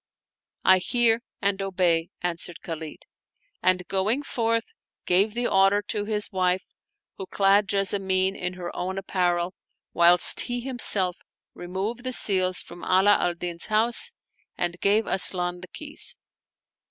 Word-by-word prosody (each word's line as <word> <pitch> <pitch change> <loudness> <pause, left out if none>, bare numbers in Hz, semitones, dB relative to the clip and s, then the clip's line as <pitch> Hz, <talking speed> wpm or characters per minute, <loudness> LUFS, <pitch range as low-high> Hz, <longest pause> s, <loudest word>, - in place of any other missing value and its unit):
" - - -59
I 185 - +3
hear 235 +3 +2 0.2
and 200 0 0
obey," 180 -4 0
answered 175 -1 -5
Khalid; 160 -2 -7 0.6
and, 180 -1 +1
going 210 +9 0
forth, 230 -3 -1 0.4
gave 200 +5 +2
the 240 0 -1
order 195 0 +3
to 205 -1 -1
his 210 0 -1
wife 185 -1 0 0.5
who 190 - -6
clad 200 +1 +2
Jessamine 195 -1 0
in 180 -1 -4
her 180 -1 -7
own 190 +1 -4
apparel, 180 -2 -1 0.4
whilst 175 +1 +6
he 245 0 0
himself 215 -8 +1 0.4
removed 195 +7 -5
the 255 0 -4
seals 185 -5 +2
from 175 - -13
Ala 195 +3 +4
al 175 - 0
Din's 170 0 -3
house 225 - +1 0.5
and 175 0 -2
gave 210 +2 +2
Asian 180 -2 +1
the 185 - -9
keys. 300 0 -2
190 Hz, 140 wpm, -25 LUFS, 180-210 Hz, 0.6 s, whilst